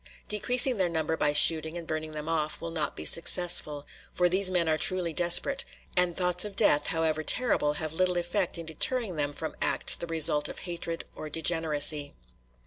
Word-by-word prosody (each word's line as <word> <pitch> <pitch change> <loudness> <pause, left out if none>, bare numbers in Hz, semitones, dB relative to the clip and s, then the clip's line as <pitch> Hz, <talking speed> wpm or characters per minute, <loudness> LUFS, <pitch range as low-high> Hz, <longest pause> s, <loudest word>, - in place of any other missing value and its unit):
Decreasing 245 +4 +1
their 185 -3 -1
number 160 -1 -3
by 150 -2 -1
shooting 160 +2 +3
and 170 - -9
burning 155 0 -6
them 150 0 -8
off 155 -2 -3
will 165 0 -8
not 160 -2 -5
be - - -9
successful; 165 -4 +4 0.3
for 180 - 0
these 185 +2 +2
men 180 -3 -2
are 160 - 0
truly 170 +1 +2
desperate, 175 - +2 0.3
and 180 -1 0
thoughts 180 -1 +1
of 205 -2 -9
death, 150 -9 +1
however 160 -1 -3
terrible, 155 -6 -1
have 155 +1 -7
little 180 +1 -1
effect 175 +1 -2
in 165 - -9
deterring 190 - -2
them 145 -1 -3
from 160 +2 -9
acts - - +4
the 170 - -7
result 155 -2 +3
of - - -10
hatred 170 -2 -7
or 155 - -9
degeneracy. 155 -2 +1
165 Hz, 185 wpm, -26 LUFS, 155-180 Hz, 0.3 s, successful